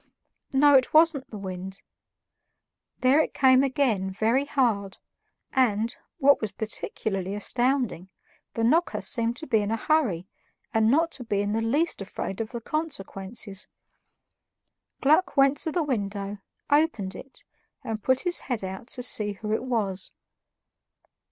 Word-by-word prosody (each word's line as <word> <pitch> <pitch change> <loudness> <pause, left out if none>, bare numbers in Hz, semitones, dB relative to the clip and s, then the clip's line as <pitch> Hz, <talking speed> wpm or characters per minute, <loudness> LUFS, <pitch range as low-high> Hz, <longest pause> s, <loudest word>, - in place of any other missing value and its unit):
No, 285 +2 +5
it 265 +2 +4
wasn't 315 -4 +4
the 215 - -8
wind; 190 0 -7 1.2
there 260 +4 +5
it - - -3
came 260 -1 +5
again 255 -9 +1
very 225 +8 +1
hard, 225 -9 0 0.6
and, 230 -3 +1 0.2
what 280 -2 +4
was 215 -3 -2
particularly 195 -2 -3
astounding, 240 -4 -1 0.5
the 230 - -1
knocker 320 +10 +2
seemed 235 -3 +2
to 315 - -7
be 220 - +2
in 205 0 -2
a 225 - 0
hurry 225 - +1 0.5
and 220 0 +3
not 325 +6 +3
to 250 - -5
be 205 -3 -1
in 205 0 -1
the 225 +1 0
least 280 +5 0
afraid 195 +1 -5
of 220 - -4
the 235 - -6
consequences. 210 - -4 1.3
Gluck 305 +3 +3
went 275 +1 +5
to 320 - 0
the 340 +1 0
window, 200 -6 -3 0.3
opened 285 - +2
it, 270 - -12 0.4
and 220 -1 -4
put 260 +4 +2
his 355 -1 +1
head 245 -6 -3
out 190 +4 -6
to 250 -2 -5
see 210 -3 0
who 210 +1 -4
it - - 0
was. 200 -7 -2
230 Hz, 145 wpm, -26 LUFS, 200-275 Hz, 1.3 s, No